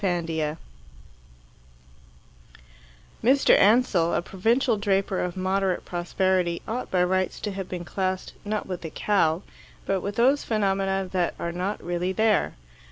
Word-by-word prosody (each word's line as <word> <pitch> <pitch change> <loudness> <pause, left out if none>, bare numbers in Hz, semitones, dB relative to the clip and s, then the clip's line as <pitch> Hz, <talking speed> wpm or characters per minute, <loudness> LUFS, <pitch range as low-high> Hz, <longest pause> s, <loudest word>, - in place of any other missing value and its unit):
III 165 -4 -1 2.7
Mr. 265 +4 +5
Ansell, 200 -6 +4
a - - +1
provincial 230 +7 +1
draper 195 -2 0
of 180 0 -3
moderate 190 0 0
prosperity, 175 0 0
ought 240 +3 -3
by 180 -1 +2
rights 185 +1 0
to 210 - -3
have 195 -1 -6
been 175 -1 -5
classed 185 0 -2
not 210 0 -2
with 180 -2 -5
the 165 - -5
cow, 175 -2 +1 0.4
but 195 -1 0
with 200 +2 -4
those 265 +5 +3
phenomena 195 -3 0
that 180 -2 0
are 170 - -3
not 185 +4 -3
really 175 +1 -1
there. 215 +2 +2
190 Hz, 135 wpm, -25 LUFS, 175-205 Hz, 2.7 s, Mr